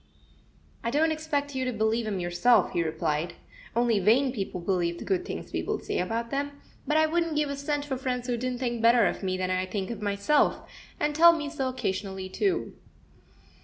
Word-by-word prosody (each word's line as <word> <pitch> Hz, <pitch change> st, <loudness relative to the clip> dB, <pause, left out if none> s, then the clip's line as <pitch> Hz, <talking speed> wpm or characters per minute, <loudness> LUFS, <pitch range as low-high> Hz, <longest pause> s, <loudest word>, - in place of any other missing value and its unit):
"I 235 Hz, -, 0 dB
don't 310 Hz, +5 st, +2 dB
expect 295 Hz, -2 st, -2 dB
you 260 Hz, 0 st, -1 dB
to 255 Hz, -, -1 dB
believe 220 Hz, 0 st, 0 dB
'em 200 Hz, -3 st, -2 dB
yourself," 180 Hz, +5 st, +3 dB
he 170 Hz, -, 0 dB
replied; 160 Hz, 0 st, -1 dB, 0.4 s
"only 235 Hz, -3 st, +3 dB
vain 245 Hz, +8 st, +4 dB
people 195 Hz, -6 st, -4 dB
believe 170 Hz, -1 st, 0 dB
the -, -, -8 dB
good 370 Hz, -1 st, 0 dB
things -, -, -6 dB
people -, -, -1 dB
say -, -, -3 dB
about 230 Hz, +5 st, -2 dB
them; 285 Hz, +1 st, -2 dB, 0.3 s
but 305 Hz, -, +2 dB
I 315 Hz, -, +5 dB
wouldn't 330 Hz, 0 st, 0 dB
give 295 Hz, -1 st, +1 dB
a -, -, -2 dB
cent 285 Hz, +1 st, -2 dB
for 270 Hz, -3 st, -3 dB
friends 250 Hz, -1 st, -2 dB
who 245 Hz, -1 st, 0 dB
didn't 250 Hz, +1 st, -2 dB
think 240 Hz, -2 st, -2 dB
better 230 Hz, -1 st, +5 dB
of -, -, -1 dB
me 185 Hz, -1 st, -1 dB
than 185 Hz, 0 st, -1 dB
I 185 Hz, 0 st, 0 dB
think 195 Hz, +2 st, -3 dB
of 225 Hz, -3 st, -6 dB
myself, 205 Hz, +8 st, +1 dB, 0.3 s
and 295 Hz, 0 st, +1 dB
tell 335 Hz, +3 st, +8 dB
me 300 Hz, -3 st, -3 dB
so 270 Hz, -4 st, -1 dB
occasionally, 190 Hz, -5 st, -3 dB
too." 370 Hz, -, -1 dB
240 Hz, 200 wpm, -27 LUFS, 195-285 Hz, 0.4 s, tell